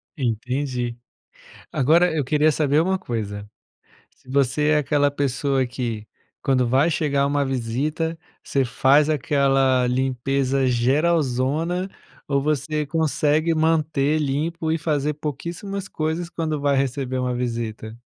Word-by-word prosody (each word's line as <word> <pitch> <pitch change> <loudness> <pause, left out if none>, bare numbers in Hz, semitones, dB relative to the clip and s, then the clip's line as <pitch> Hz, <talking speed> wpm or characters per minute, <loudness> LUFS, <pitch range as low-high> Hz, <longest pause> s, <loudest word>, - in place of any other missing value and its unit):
Entendi. 125 -1 -2 0.8
Agora 165 +7 +3
eu 145 - 0
queria 150 +3 +3
saber 150 0 +2
uma 190 +2 +1
coisa, 105 - -5 0.7
se - - -22
você 140 +2 +1
é 155 - +4
aquela 145 0 +2
pessoa 135 -1 0
que, 115 -4 -4 0.3
quando 130 -2 +2
vai 135 +7 +3
chegar 145 -3 +1
uma 145 0 +1
visita, 140 +6 -2 0.3
você 135 -1 0
faz 140 +5 +3
aquela 135 -4 +2
limpeza 130 +1 0
geralzona, 150 +6 +1 0.4
ou 140 -1 +1
você 150 +1 -1
consegue 155 +1 +1
manter 155 -2 +1
limpo, 160 +3 -1
e 160 - +1
fazer 150 -1 -1
pouquíssimas 170 +7 -5
coisas 160 +2 -2
quando 155 -3 -2
vai 140 -1 +2
receber 135 -1 -1
uma 125 -1 -1
visita? 115 -2 -4
140 Hz, 125 wpm, -23 LUFS, 130-155 Hz, 0.8 s, é